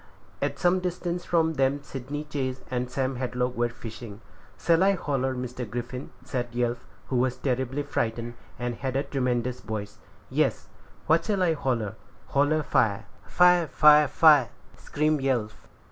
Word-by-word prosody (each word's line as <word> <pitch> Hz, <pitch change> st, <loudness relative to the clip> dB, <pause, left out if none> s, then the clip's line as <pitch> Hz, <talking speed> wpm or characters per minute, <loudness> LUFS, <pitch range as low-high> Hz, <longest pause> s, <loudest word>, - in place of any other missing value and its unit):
At -, -, -1 dB
some 180 Hz, +1 st, +3 dB
distance 180 Hz, -1 st, -3 dB
from 160 Hz, -1 st, +2 dB
them 140 Hz, 0 st, +1 dB
Sydney 140 Hz, +3 st, -6 dB
Chase 135 Hz, -4 st, -3 dB
and 125 Hz, 0 st, -2 dB
Sam 130 Hz, 0 st, -2 dB
Hadlock 125 Hz, 0 st, -1 dB
were 120 Hz, 0 st, +1 dB
fishing. 115 Hz, -3 st, -9 dB, 0.4 s
"Shall 165 Hz, 0 st, +3 dB
I 195 Hz, +1 st, +5 dB
holler, 135 Hz, -7 st, -1 dB
Mr. 125 Hz, -2 st, -5 dB
Griffin?" 120 Hz, +3 st, -5 dB, 0.2 s
said 125 Hz, -2 st, -2 dB
Yelf, 120 Hz, -1 st, -1 dB, 0.2 s
who 130 Hz, -, 0 dB
was 125 Hz, +1 st, +1 dB
terribly 130 Hz, +2 st, -1 dB
frightened, 120 Hz, -4 st, -2 dB, 0.2 s
and 120 Hz, 0 st, -2 dB
had 130 Hz, +2 st, -4 dB
a 135 Hz, -, +1 dB
tremendous 125 Hz, -3 st, -1 dB
voice. 105 Hz, -1 st, -6 dB, 0.3 s
"Yes." -, -, 0 dB, 0.4 s
"What 160 Hz, +1 st, +3 dB
shall 200 Hz, -4 st, +1 dB
I 170 Hz, -2 st, +3 dB
holler?" 120 Hz, -9 st, -1 dB, 0.4 s
"Holler 145 Hz, +2 st, +2 dB
fire." 105 Hz, -5 st, +1 dB, 0.2 s
"Fire! 180 Hz, -2 st, +5 dB
fire! 150 Hz, +1 st, +6 dB
fire!" 145 Hz, -5 st, +5 dB, 0.3 s
screamed 150 Hz, 0 st, 0 dB
Yelf. 120 Hz, -6 st, -2 dB
130 Hz, 150 wpm, -26 LUFS, 120-150 Hz, 0.4 s, fire